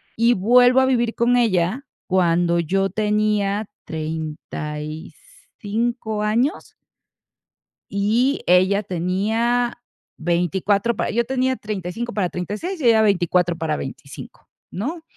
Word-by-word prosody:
y 230 +2 +4
vuelvo 245 +5 +5
a 260 - +3
vivir 240 -3 +1
con 245 +1 +2
ella 220 +3 +1 0.2
cuando 175 -2 +2
yo 195 +4 0
tenía 210 -1 0 0.2
35 160 +8 -5
años. 240 - 0 1.3
Y 225 +7 +1
ella 185 +3 +4
tenía 215 +7 0 0.4
24 190 +6 0
para - - -2
yo 235 +1 +1
tenía 260 0 0
35 210 +2 -5
para 190 -4 0
36 210 - -4
y - - -2
ella 220 -1 +5
24 180 -4 +2
para 155 -2 -1
25, 135 +1 -9 0.2
¿no? 300 - -4
205 Hz, 105 wpm, -21 LUFS, 180-235 Hz, 1.3 s, vuelvo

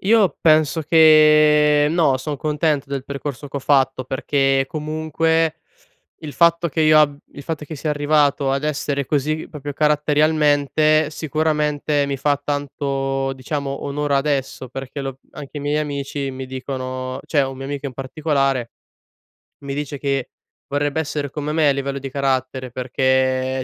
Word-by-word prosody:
Io 210 -2 +3
penso 155 0 +3
che 150 -1 +5
no, 155 -5 +2
son 145 +3 -4
contento 150 -1 -1
del 140 -2 -3
percorso 140 0 -6
che 140 - -6
ho - - -2
fatto 135 -2 +2
perché 135 +1 +1
comunque 160 +1 -1 0.6
il 150 -3 -8
fatto 170 0 +3
che 160 +1 0
io 155 0 +6
ab 145 -1 +2 0.2
il 145 - -10
fatto 155 0 -4
che 155 +1 -8
sia 150 +2 -2
arrivato 145 -2 +2
ad 135 +2 -1
essere 140 -2 -2
così 155 +3 -1
proprio 145 -1 -7
caratterialmente, 150 0 +2
sicuramente 150 -1 0
mi 140 -1 -3
fa 145 +1 +1
tanto, 135 -1 -2
diciamo, 140 +1 -4
onor 145 0 -2
adesso 135 -2 -1
perché 135 +2 -7
lo 135 -1 -5
anche 145 0 -10
i - - -3
miei 145 +1 0
amici 140 -2 -3
mi 130 0 -6
dicono 130 0 -5
cioè, 150 - +1
un 135 0 -6
mio 135 - -7
amico 140 +1 -4
in 130 - -7
particolare 135 -2 -1 0.9
mi 140 0 -4
dice 145 0 -4
che 140 -2 -2 0.4
vorrebbe 145 +2 -1
essere 145 -2 -3
come 150 +2 -4
me 155 -2 +3
a - - +5
livello 140 0 -3
di 135 - -6
carattere, 130 -1 -2
perché 130 +1 0
145 Hz, 155 wpm, -20 LUFS, 135-150 Hz, 0.9 s, io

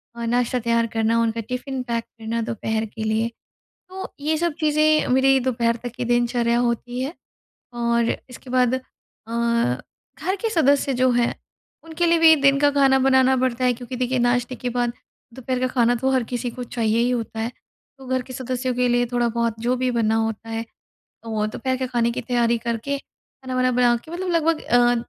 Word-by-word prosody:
अ, 235 - -4
नाश्ता 245 +1 +1
तैयार 230 0 +1
करना 225 +1 +2
उनका 230 0 0
टिफिन 255 +1 -3
पैक 235 -2 -2
करना 230 0 -5
दोपहर 220 -1 -2
के 220 +1 -7
लिए। 220 +1 +1 0.6
तो 380 +1 -7
ये 310 +2 0
सब 340 -1 0
चीज़ें 305 0 +3
मेरी 265 +1 +4
दोपहर 235 -2 0
तक 245 - -4
की 245 -1 -3
दिनचर्या 240 0 +1
होती 245 +1 -1
है 275 +5 -3 0.7
और 235 0 +2 0.2
इसके 250 +1 -11
बाद 255 0 +3
अ, 260 - -1 1.4
घर 370 +5 -1
के 455 - 0
सदस्य 285 -6 +3
जो 255 +1 +3
हैं 240 0 +1 0.5
उनके 330 +1 -1
लिए 335 0 +4
भी 320 -1 +8
दिन 275 0 +5
का 290 0 +5
खाना 275 -1 +4
बनाना 265 0 +4
पड़ता 255 0 0
है 250 - +4
क्योंकि 245 +1 -7
देखिए 255 +1 0
नाश्ते 245 +1 +1
के 250 - -4
बाद 240 0 0 0.4
दोपहर 255 0 -3
का 255 - +2
खाना 245 -2 +2
तो 265 +3 0
हर 260 -1 +2
किसी 245 0 -2
को 250 +1 -6
चाहिए 225 -1 0
ही 240 +1 +2
होता 230 -2 -3
है। 230 - -2 0.5
तो 265 - -12
घर 260 0 0
के 255 - -11
सदस्यों 255 0 -2
के 250 0 +1
लिए 245 0 +2
थोड़ा-बहुत 235 -1 0
जो 245 +2 +1
भी 255 0 0
बनना 225 -2 +1
होता 225 0 -2
है 225 0 -2 0.6
तो 220 -2 -2
दोपहर 260 +4 -2
के 260 0 -2
खाने 235 -2 +1
की - - -3
तैयारी 235 -1 +1
करके 235 +5 -3
खाना-वाना 255 -2 -4
बना 245 -1 +3
के 275 +7 -12
मतलब 370 +2 -4
लगभग 330 -1 +2
अ, 245 0 +4
245 Hz, 195 wpm, -22 LUFS, 235-265 Hz, 1.4 s, भी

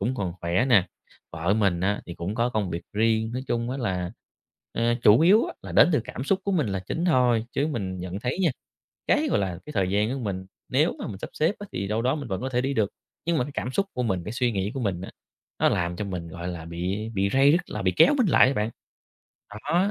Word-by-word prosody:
cũng 130 - 0
còn 95 -6 -2
khỏe 85 +8 +1
nè, 100 -7 +5 0.5
vợ 85 +4 0
mình 100 -5 +2
á 100 +2 0
thì 85 - -7
cũng 90 +5 -4
có 120 +2 +1
công 105 -6 -1
việc 85 +1 -4
riêng. 110 +1 +1
Nói 125 +1 -3
chung 120 +1 -1
á 130 - -2
là, 90 -7 -2 0.6
à, 120 0 +1
chủ 105 +6 +7
yếu 200 +7 +6
á - - -6
là - - -8
đến - - +7
từ 150 - +3
cảm 130 - -6
xúc 190 +4 +1
của 200 - 0
mình 155 -8 +2
là 95 -1 -2
chính 165 - -2
thôi, 125 -9 +3
chứ 140 - +1
mình 95 - -3
nhận 90 +2 -5
thấy 125 +7 -2
nha, 170 - +4 0.6
cái, - - +3
gọi - - +2
là, 95 -3 -2
cái 150 - -8
thời 95 -2 +1
gian 105 +4 +1
của 135 - -3
mình, 95 -5 -4 0.2
nếu - - +2
mà - - -4
mình 95 - -6
sắp - - -6
xếp 160 +7 +1
á 205 - -7
thì 95 +2 -2
đâu 110 +2 0
đó 130 +5 +1
mình 145 - -5
vẫn 95 0 -3
có 130 - -2
thể 125 -1 +1
đi 135 +1 -1
được, 105 -5 +1 0.4
nhưng 170 -1 +1
mà 125 - +2
cái 145 - -7
cảm 125 - -3
xúc 195 - +1
của 125 - -1
mình, 95 -7 -1
cái 105 - -4
suy 120 0 +1
nghĩ 100 0 -1
của 135 - -4
mình 100 -7 -1
á, 95 - -7 0.5
nó - - +4
làm 85 0 -1
cho 105 - -3
mình 90 -3 -5
gọi 85 +2 -6
là 85 -3 -5
bị 90 +6 -3
bị 100 -1 +1
ray 135 +2 +6
rứt, 175 +3 +3
là 105 - -4
bị 95 - +2
kéo 295 - +7
mình 240 -6 +3
lại 150 - +6
á 135 - +1
bạn. 105 -3 0 0.8
Đó, 170 - 0
110 Hz, 270 wpm, -26 LUFS, 95-130 Hz, 0.8 s, chủ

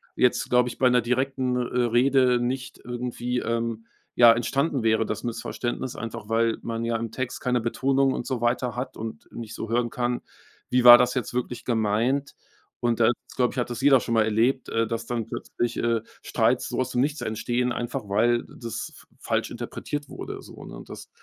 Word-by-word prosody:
jetzt, 125 - +2
glaube 125 0 +3
ich, - - -9
bei 130 -1 +4
'ner 125 -1 +4
direkten, 130 +1 0
äh, - - +1 0.3
Rede 125 +1 +3
nicht 125 +2 -3
irgendwie, 125 0 -3
ähm, 115 0 -2 0.3
ja 120 -1 +8
entstanden 130 +3 0
wäre, 110 0 +3
das 105 - -4
Missverständnis, 120 +1 -4
einfach 115 -2 -6
weil 115 0 +1
man 115 0 -3
ja 115 0 0
im 115 -1 -4
Text 130 0 -4
keine 125 -2 +1
Betonung 135 +3 +1
und - - -4
so 130 -4 -2
weiter 120 0 0
hat 125 +2 -5
und 110 0 -7
nicht 115 -2 -7
so 115 - -5
hören 120 0 +1
kann: 120 0 -2 0.5
Wie 125 -1 +2
war 120 0 +12
das 125 0 +2
jetzt 125 -3 -3
wirklich 125 0 -3
gemeint? 115 +4 0 0.5
Und 120 -1 +1
da, 115 0 +5 0.3
glaube 125 -1 +1
ich, - - -10
hat 120 - -1
das 120 -1 -4
jeder 135 -2 +6
schon 115 - -2
mal 110 - +4
erlebt, 115 +5 +1
äh, 115 -1 +1
dass 115 0 -3
dann 115 -2 -3
plötzlich, 120 +1 -3
äh, 115 -2 +1 0.2
Streits - - +1
so - - -3
aus 130 0 0
dem 125 - +1
Nichts 150 +2 -1
entstehen, 120 +3 -1
einfach 120 -3 -4
weil 120 +4 +2
das 115 -1 -6
f - - -16
falsch - - -1
interpretiert 145 0 -5
wurde - - -7
so, - - -12
ne? - - -9
Und - - -11
das - - -9
120 Hz, 200 wpm, -25 LUFS, 115-125 Hz, 0.5 s, war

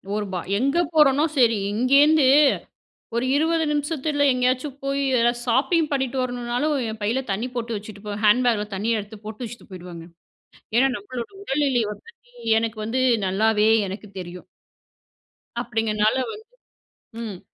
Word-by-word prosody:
ஒரு 210 - -2
ப - - -2 0.2
எங்க 275 +7 +1 0.2
போறேனோ 295 -1 +5
சரி! 230 -4 +4 0.2
இங்கேருந்து 280 +6 +4 0.9
ஒரு 235 - 0
0:20 320 +2 +2
நிமிஷத்தில 295 -1 0
எங்கேயாச்சும் 255 +2 -1
போயி 275 0 -1 0.2
எதா 235 +1 +4
ஷாப்பிங் 300 +7 +2
பண்ணிட்டு 265 -2 -1
வரணுனாலும், 245 +4 -1
என் 220 0 -7
பையில 230 +5 +1
தண்ணீ 215 +6 -2
போட்டு 235 -1 -3
வச்சுட்டு 205 0 -11
போவேன். 205 0 -5
ஹேண்ட் 240 +5 +5
பேக்கில 210 -3 +1
தண்ணீய 220 +3 0
எடுத்து 210 +1 -12
போட்டு 215 +3 -7
வச்சுட்டு 230 0 -11
போயிடுவேங்க. 175 -2 -9 0.7
ஏனா, 270 +2 +4
நம்மளோட 235 +4 -7
உடல்நிலை 270 - +1
வந்துட்டு 470 - -19 0.3
எனக்கு 225 -1 -4
வந்து 255 +4 -1 0.3
நல்லாவே 215 +2 +2 0.2
எனக்கு 200 +2 -8
தெரியும். 180 0 -9 1.2
அப்பிடிங்கிறனால 220 -2 0 0.2
வந்து, 435 0 -10 0.8
ம். 205 -6 -6
240 Hz, 135 wpm, -23 LUFS, 215-275 Hz, 1.2 s, போறேனோ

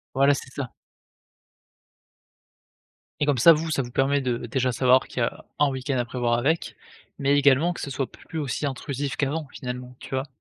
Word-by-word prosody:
Voilà 140 +1 +5
c'est 135 - -5
ça. 135 -4 -4 2.5
Et - - +3
comme 145 -3 +2
ça, 165 - +9
vous 160 +1 -2
ça 140 - +1
vous 120 - -6
permet 140 +2 +2
de 125 -3 0
déjà 130 +2 0
savoir 130 +2 +4
qu'il - - -5
y - - +4
a - - -6 0.2
1 145 - +4
week-end 130 0 -2
à 120 - 0
prévoir 120 0 -1
avec, 160 +7 0 0.4
mais 140 +1 +3
également 145 +5 +4
que - - -8
ce - - -4
soit 135 -1 -3
plus 160 - -10
aussi 145 0 -2
intrusif 140 0 -3
qu'avant, 145 +2 -1
finalement, 125 0 -6
tu - - -11
vois? 130 +2 -2
135 Hz, 190 wpm, -25 LUFS, 125-145 Hz, 2.5 s, ça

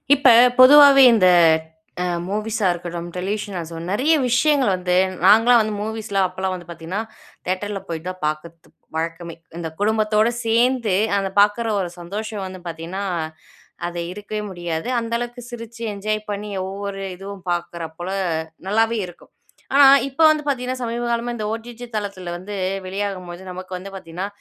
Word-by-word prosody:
இப்ப, 275 -1 +2 0.3
பொதுவாவே 275 +1 +9
இந்த 185 -4 +4 0.8
அ - - -1 0.2
மூவிஸா 210 +1 -2
இருக்கட்டும், 175 0 -5
டெலிவிஷன் 200 +2 -3
ஆ - - -2
சோ 165 - -8
நெறைய 260 +11 +2
விஷயங்கள் 265 -1 +3
வந்து 180 -1 0 0.3
நாங்கலாம் 225 +4 +7
வந்து 215 0 -2
மூவிஸ்லா 215 -2 -2
அப்போலாம் 185 +1 -3
வந்து 175 -1 -10
பார்த்தீங்கன்னா, 170 +4 -4 0.4
தியேட்டர்ல 195 +2 -2
போய் 165 -2 -4
தான் 185 0 -6
பார்க்கது 165 +2 -5 0.3
வழக்கமே. 165 +1 -4 0.2
இந்த 165 -1 -4
குடும்பத்தோட 215 +1 +2 0.2
சேர்ந்து, 230 -2 +2 0.2
அந்த 195 -1 -3
பார்க்குற 210 +3 +3
ஒரு 175 -2 -4
சந்தோஷம் 205 +3 -5
வந்து 185 -1 -8
பார்த்தீங்கன்னா, 170 +4 -5 0.9
அது 175 0 -4
இருக்கவே 210 +2 -5
முடியாது. 175 +2 -4
அந்த 230 0 -6
அளவுக்கு 240 0 -7
சிரிச்சு 230 -1 -9
என்ஜாய் 215 +1 -3
பண்ணி 205 0 -5 0.2
ஒவ்வொரு 195 0 -5
இதுவும் 195 0 -9
பார்க்குற 170 -1 -4
போல 175 +2 -5 0.6
நல்லாவே 225 +2 +2
இருக்கும். 175 - -16 0.4
ஆனா 280 0 +8 0.2
இப்ப 275 +4 -2
வந்து 310 -1 +2
பார்த்தீங்கன்னா, 255 -3 -2
சமீபகாலமா 235 0 -2
இந்த 215 -3 -4
ஓடிஜி 235 +1 -7
தளத்துல 200 -4 -4
வந்து 200 +4 -8 0.3
வெளியாகும்போது 185 -2 -5
நமக்கு 185 +1 -8
வந்து 190 +2 -8
பார்த்தீங்கன்னா, 180 0 -6
205 Hz, 145 wpm, -21 LUFS, 180-230 Hz, 0.9 s, பொதுவாவே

